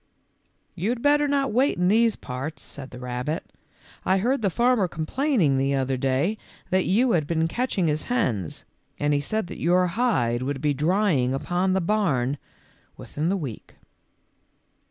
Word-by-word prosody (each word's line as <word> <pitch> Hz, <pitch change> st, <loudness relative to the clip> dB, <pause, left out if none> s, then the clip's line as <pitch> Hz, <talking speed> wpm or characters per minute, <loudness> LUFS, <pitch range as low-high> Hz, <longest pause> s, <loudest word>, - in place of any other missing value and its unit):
You 185 Hz, +4 st, -2 dB
had 240 Hz, 0 st, -2 dB
better 290 Hz, 0 st, +4 dB
not 280 Hz, -2 st, +1 dB
wait 260 Hz, +5 st, +2 dB
in 180 Hz, 0 st, +2 dB
these 225 Hz, +2 st, +4 dB
parts," 135 Hz, +4 st, -6 dB
said 135 Hz, -1 st, -8 dB
the 125 Hz, -, -10 dB
rabbit; 125 Hz, +5 st, -3 dB, 0.3 s
" -, -, -26 dB
I 190 Hz, -, +2 dB
heard 245 Hz, +7 st, +1 dB
the 200 Hz, -, +2 dB
farmer 235 Hz, +1 st, +2 dB
complain 250 Hz, -, -1 dB
ing 140 Hz, -4 st, +3 dB
the 135 Hz, +1 st, +1 dB
other 135 Hz, 0 st, 0 dB
day 135 Hz, +11 st, 0 dB, 0.3 s
that 185 Hz, 0 st, +2 dB
you 235 Hz, +7 st, +3 dB
had 155 Hz, -7 st, +1 dB
been 160 Hz, 0 st, +1 dB
catching 220 Hz, -2 st, -1 dB
his 155 Hz, -1 st, 0 dB
hens, 125 Hz, -, -1 dB, 0.3 s
and 145 Hz, 0 st, +1 dB
he 145 Hz, -, +2 dB
said 215 Hz, +9 st, -1 dB
that -, -, -9 dB
your 180 Hz, +2 st, +3 dB
hide 135 Hz, -, +1 dB
would 135 Hz, +1 st, -2 dB
be 145 Hz, +1 st, +1 dB
drying 150 Hz, -4 st, +1 dB
upon 180 Hz, +6 st, 0 dB
the 190 Hz, -, +1 dB
barn 150 Hz, -, 0 dB, 0.6 s
within 155 Hz, +4 st, -3 dB
a 200 Hz, -, +1 dB
week." 135 Hz, -, -7 dB
170 Hz, 175 wpm, -25 LUFS, 135-215 Hz, 0.6 s, better